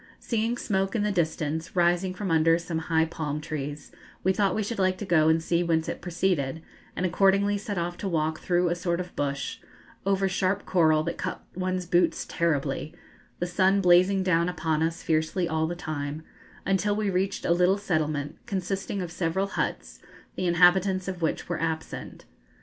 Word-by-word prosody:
Seeing 230 +1 -1
smoke 195 -2 -1
in 215 - +1
the 210 - +1
distance, 160 -1 -2
rising 175 +1 +2
from 190 -2 -3
under 165 +1 +4
some 170 -1 -3
high 160 -1 +3
palm 150 -2 -4
trees, 145 -1 -5 0.3
we 190 - +3
thought 195 -1 +1
we 215 - 0
should 215 +1 -4
like 185 -1 +2
to 205 - -5
go 160 -4 +4
and 160 0 +2
see 170 +1 +1
whence 165 -1 +1
it - - -4
proceeded, 165 -4 -1 0.3
and 185 - -1
accordingly 195 +3 +3
set 205 -1 -4
off 175 +1 -2
to 195 - -3
walk 155 -2 0
through 175 -1 +1
a 175 - 0
sort 175 0 -1
of 180 0 -6
bush, 140 -1 -2 0.4
over 195 0 +2
sharp 190 +1 0
coral 155 -4 +3
that 170 +1 -4
cut 185 - -4
one's 185 0 -2
boots 175 0 +2
terribly, 145 -3 -1 0.4
the 175 - -1
sun 190 +2 +3
blazing 185 +1 +4
down 170 -1 +2
upon 160 -3 -1
us 165 +1 -1
fiercely 160 +3 0
all 160 -1 0
the 175 - -3
time, 155 -2 -4 0.4
until 200 +2 +1
we 210 -2 0
reached 190 +2 -1
a - - +2
little 180 +3 +4
settlement, 155 -6 -2
consisting 195 0 -2
of 170 - -6
several 185 +3 -1
huts, - - -3 0.3
the 185 - -2
inhabitants 185 +2 +4
of 185 -2 -4
which 160 - -1
were 175 - -3
absent. 160 -1 -4
175 Hz, 185 wpm, -27 LUFS, 160-190 Hz, 0.4 s, under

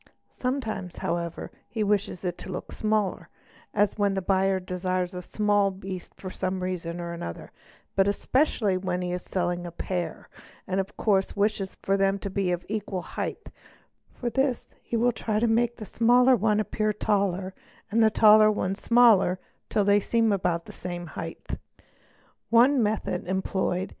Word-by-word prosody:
Sometimes 220 -9 -3
however 170 -1 -3 0.2
he 220 -2 -1
wishes 200 -3 0
it 175 -1 -1
to 190 - -7
look - - -6
smaller, 215 -3 -1 0.4
as 205 +1 +1
when 200 -1 +2
the 190 -2 -3
'ighe 195 0 +3
desires 185 0 -2
a 180 - -5
small 205 +1 +2
beast 190 -1 -8
for 185 - -7
some 185 0 -2
reason 175 -2 -3
or 170 0 -4
other, 85 -1 -7 0.4
but 195 0 +4
especially 210 -2 +1
when 180 -1 -2
he 180 - -2
is 180 0 -2
selling 175 -1 -2
a 175 - -6
pair 175 +1 -4 0.4
and 185 +1 -1
of 195 - -4
course 195 -3 +1
wishes 200 -2 0
them 195 0 +2
to 200 0 -5
be 195 -1 0
of 175 0 -2
equal 205 -3 -3
height; - - -5 0.6
for 240 -1 -4
Pihis 265 -2 0
he 235 - -2
will 240 +2 +3
try 220 -2 -1
to 235 - +2
make 235 +1 +2
the 215 - -7
smaller 245 +4 +4
one 215 -1 +2
appear 215 0 0
taller 195 -3 0 0.4
and 230 +2 +3
the 220 - +6
taller 215 0 +7
one 190 -3 -1
i - - 0
smaller 210 -4 +4 0.3
till 210 - +2
they 205 +1 +4
seem 225 +2 +2
about 180 -4 0
the - - -10
same 175 -1 -6
height. - - -6 0.9
One 245 +4 +5
method 210 -5 -1
employed. 190 0 -1
195 Hz, 170 wpm, -26 LUFS, 185-215 Hz, 0.9 s, taller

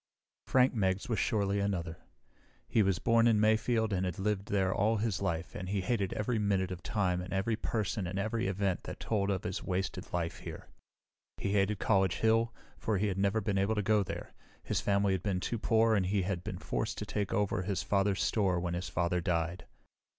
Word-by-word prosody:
Frank 130 0 +4
Meggs 95 +1 0
was 115 -5 0
surely 100 -2 +1
another. 85 -5 -2 0.7
He 110 - +3
was 95 -3 +2
born 115 +7 +4
in 110 -3 +4
Mayfield 110 0 +2
and 95 -1 0
had 90 -3 -2
lived 100 0 -1
there 95 -2 +1
all 110 +3 +2
his 110 -2 -1
life 80 0 -2
and 90 0 -5
he 100 -1 0
hated 100 -3 0
every 110 +2 -1
minute 95 -3 +1
of 90 -1 -5
time 90 -5 0
and 90 +1 -7
every 95 +4 0
person 105 -3 -2
and 90 +2 -4
every 110 +1 -1
event 95 -1 -1
that - - -7
told 100 -3 0
of 95 -2 -1
his 95 +2 -3
wasted 95 0 -3
life 85 -1 -2
here. - - -9 0.7
He 100 - -2
hated 100 +1 +2
College 95 -3 +2
Hill, 115 +1 +2 0.3
for 110 -2 0
he 105 +2 +1
had 95 0 -2
never 100 +3 +2
been 100 -2 0
able 100 +3 +1
to 105 - 0
go 105 +1 +3
there. 95 - -5 0.3
His - - -1
family 100 -1 +2
had 95 - -1
been 95 -2 -1
too 115 +5 -2
poor, 115 +1 +3
and 95 -4 +2
he 100 0 +1
had 90 -2 -2
been - - -4
forced - - -3
to 105 - -4
take 105 -1 -2
over 100 -2 +1
his 95 -2 -2
father's 100 -1 +1
store 95 -5 +1
when 85 0 -2
his 90 +1 -3
father 90 +1 0
died. 85 +1 -1
100 Hz, 210 wpm, -32 LUFS, 95-110 Hz, 0.7 s, Frank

